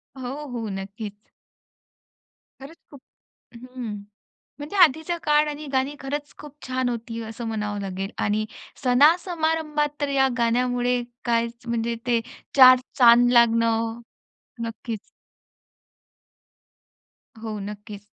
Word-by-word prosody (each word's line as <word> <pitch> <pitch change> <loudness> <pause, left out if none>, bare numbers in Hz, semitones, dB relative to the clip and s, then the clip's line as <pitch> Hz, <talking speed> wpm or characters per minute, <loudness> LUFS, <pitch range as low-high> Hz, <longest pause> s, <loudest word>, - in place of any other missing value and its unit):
हो, 265 +3 -6
हो, 230 -3 -4
नक्कीच. 200 +2 -6 1.5
खरंच 300 +5 -11
खूप 280 -2 -13 0.5
हं, 250 -1 -7 0.7
म्हणजे 295 +7 -7
आधीच्या 320 +3 +2
काळ 300 0 +3
आणि 295 +1 -6
गाणी 265 +3 0
खरंच 290 +2 -5
खूप 295 -1 -11
छान 255 -1 -1
होती 230 -1 -5
असं 225 +1 -7
म्हणावं 210 -2 -3
लागेल 195 0 -4
आणि 215 +1 0 0.4
सणा-समारंभात 310 +2 +2
तर 285 - 0
या 270 -1 +3
गाण्यामुळे 245 +1 +1 0.2
काय 235 0 +2 0.2
म्हणजे 235 0 -1
ते 235 -1 +3 0.4
4 255 -1 +9 0.2
चांद 245 0 +7
लागणं 230 -1 +3 0.6
नक्कीच. 225 -1 -5 2.4
हो, 220 -2 -5
नक्कीच. 205 -1 -9
245 Hz, 105 wpm, -24 LUFS, 225-285 Hz, 2.4 s, 4